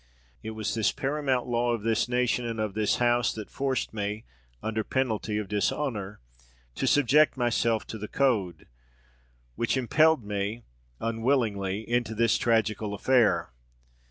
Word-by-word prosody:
It 110 0 -6
was 110 - -2
this 110 -2 +2
paramount 135 -2 -1
law 120 0 0
of 115 -3 -3
this 115 +1 +1
nation 125 0 +1
and 115 -1 -4
of 110 -2 -2
this 105 0 +1
House 120 -2 +2
that 110 -2 -8
forced 135 -4 -2
me, 105 +1 -3 0.4
under 110 0 -1
the - - -11
penalty 110 -5 -1
of 105 -2 -3
dishonour, 105 -1 -2 0.5
to - - -2
subject 145 +1 +4
myself 115 -2 +1
to 110 - -7
the 105 - -5
code, 105 - 0 0.9
which 115 - 0
impelled 155 +1 +3
me 105 +3 -3 0.4
unwillingly 110 -4 -1
into 120 -1 0
this 115 0 +2
tragical 110 -2 +1
affair. 120 - +2
115 Hz, 145 wpm, -27 LUFS, 105-125 Hz, 0.9 s, subject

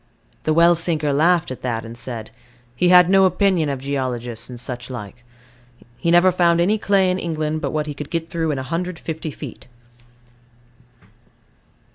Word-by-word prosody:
The 155 - +2
well 170 +1 +6
sinker 160 -3 0
laughed 170 +2 +2
at 130 - -7
that, 115 -2 -3
and 115 +1 -9
said, 115 -2 -5 0.4
"He 180 +5 +2
had 180 -1 +7
no 195 +1 +5
opinion 185 -4 +2
of 135 -2 -3
geologists, 130 -4 -3
and 125 -1 -8
such 125 0 -5
like. 120 -1 -8 0.7
He 130 +8 -2
never 175 +2 +5
found 170 -1 +2
any 205 +5 +2
clay 195 -3 +2
in 185 - -1
England 155 -2 -2
but - - -2
what 155 -1 -2
he 150 - -5
could 145 0 -8
get 165 -1 -3
through 165 -1 -2
in 145 - -1
150 165 +2 -4
feet." 140 - -10
155 Hz, 165 wpm, -21 LUFS, 130-175 Hz, 0.7 s, had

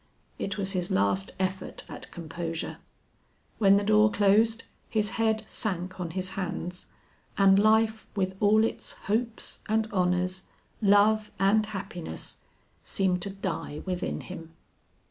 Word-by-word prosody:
It 195 -1 -2
was 195 -1 -1
his 180 -3 -1
last 100 0 +1
effort 190 0 -3
at - - -8
composure. 165 0 -5 0.8
When 200 -2 +6
the 200 - +3
door 215 +1 +5
closed, 215 +3 +3 0.3
his 215 -1 0
head 220 -1 +2
sank 185 -4 -3
on 175 -2 -3
his 185 +2 -3
hands, 180 -1 -4 0.5
and 195 0 +6
life 220 +1 +3
with 190 -2 0
all 215 +1 +5
its 225 - -2
hopes 225 +3 -2
and 220 0 +2
honors, 180 0 0 0.3
love 210 +1 +4
and 205 +3 +3
happiness, 180 - -5 0.4
seemed 185 -2 0
to 200 - -2
die 190 -6 -4
within 185 -1 -2
him. 165 -3 -9
195 Hz, 130 wpm, -28 LUFS, 180-215 Hz, 0.8 s, When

